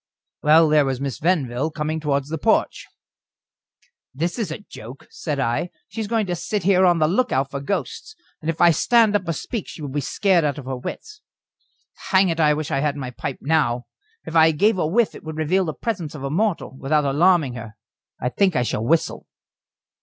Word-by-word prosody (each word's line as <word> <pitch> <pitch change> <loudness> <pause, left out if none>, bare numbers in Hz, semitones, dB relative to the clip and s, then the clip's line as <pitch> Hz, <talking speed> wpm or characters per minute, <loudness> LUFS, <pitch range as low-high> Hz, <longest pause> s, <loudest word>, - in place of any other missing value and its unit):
Well, 155 +2 +6
there 150 -1 +4
was 135 -2 -2
Miss 135 -4 -4
Venville 150 -5 0
coming 155 +1 -3
towards 140 -2 -1
the 160 0 -3
porch. - - +1 1.3
"This 170 - -2
is 215 -6 -2
a 155 - -4
joke," 120 +5 -11
said 150 -4 -4
I. 125 +7 -1 0.2
"She 225 - -5
is 215 - -3
going 225 -1 0
to 180 -2 -2
sit 205 +3 -3
here 185 0 +4
on 175 -1 +4
the 155 -1 +3
look 240 +9 +1
out 135 +1 0
for 140 - -4
ghosts, 205 - -4 0.3
and 155 - -3
if 165 - -2
I 175 -1 +7
stand 225 +5 +3
up 190 -4 0
or 165 - 0
speak 220 - -5
she - - -10
will 145 -2 -5
be 145 +2 -2
scared 185 - +2
out 145 -1 -1
of 140 - -8
her 130 0 -3
wits. 425 - -8 0.9
Hang 190 -1 +4
it, 165 0 -2
I 150 -2 +4
wish 155 +1 -4
I 135 - +1
had 145 0 0
my 130 -3 -5
pipe 130 +2 -5
now; 135 -5 +1 0.4
if 165 - -7
I 160 0 +7
gave 190 +6 +2
a 155 - +1
whiff 220 +7 +2
it - - -12
would 160 -1 -7
reveal 180 +5 +1
the 155 - -3
presence 180 -10 -4
of 140 - -8
a 135 - -3
mortal, 190 -5 -1
without 150 +2 +1
alarming 150 -1 +3
her. 110 -2 -9 0.4
I 125 - -1
think 185 +5 +1
I 125 - +2
shall 110 -2 -2
whistle." 160 +7 0
155 Hz, 215 wpm, -22 LUFS, 140-185 Hz, 1.3 s, I